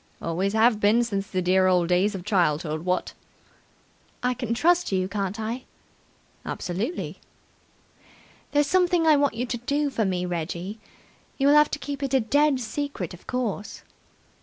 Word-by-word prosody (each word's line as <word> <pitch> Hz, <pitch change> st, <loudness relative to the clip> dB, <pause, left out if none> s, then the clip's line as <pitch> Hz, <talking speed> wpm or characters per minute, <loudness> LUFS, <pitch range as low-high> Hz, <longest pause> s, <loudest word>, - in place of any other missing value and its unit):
"Always 185 Hz, +5 st, -1 dB
have 220 Hz, 0 st, +4 dB
been 215 Hz, +3 st, +4 dB
since 200 Hz, -4 st, -3 dB
the 185 Hz, -1 st, -2 dB
dear 185 Hz, +1 st, +3 dB
old 180 Hz, -2 st, +3 dB
days 190 Hz, +4 st, +2 dB
of 180 Hz, -2 st, -7 dB
childhood, 160 Hz, -5 st, 0 dB
what!" 180 Hz, 0 st, -1 dB, 1.1 s
"I 250 Hz, 0 st, +2 dB
can 240 Hz, -2 st, -3 dB
trust 350 Hz, +4 st, +2 dB
you, 185 Hz, -1 st, +1 dB
can't 200 Hz, +1 st, -3 dB
I?" 230 Hz, +4 st, -4 dB, 0.8 s
"Absolutely!" 200 Hz, -, -4 dB, 1.3 s
"There's 290 Hz, 0 st, +3 dB
something 355 Hz, +1 st, +2 dB
I 310 Hz, -1 st, +6 dB
want 285 Hz, -4 st, +1 dB
you 240 Hz, +2 st, -2 dB
to 240 Hz, 0 st, -3 dB
do 285 Hz, +3 st, -1 dB
for 230 Hz, -, 0 dB
me, 180 Hz, -2 st, -1 dB
Reggie. 175 Hz, +4 st, -4 dB, 0.6 s
You'll 280 Hz, +1 st, +4 dB
have 300 Hz, 0 st, +6 dB
to -, -, -3 dB
keep 285 Hz, -1 st, -6 dB
it 275 Hz, -1 st, 0 dB
a -, -, +5 dB
dead 285 Hz, +4 st, +2 dB
secret 255 Hz, -, -4 dB
of 180 Hz, -, -14 dB
course." 230 Hz, -5 st, -3 dB
220 Hz, 160 wpm, -25 LUFS, 185-280 Hz, 1.3 s, I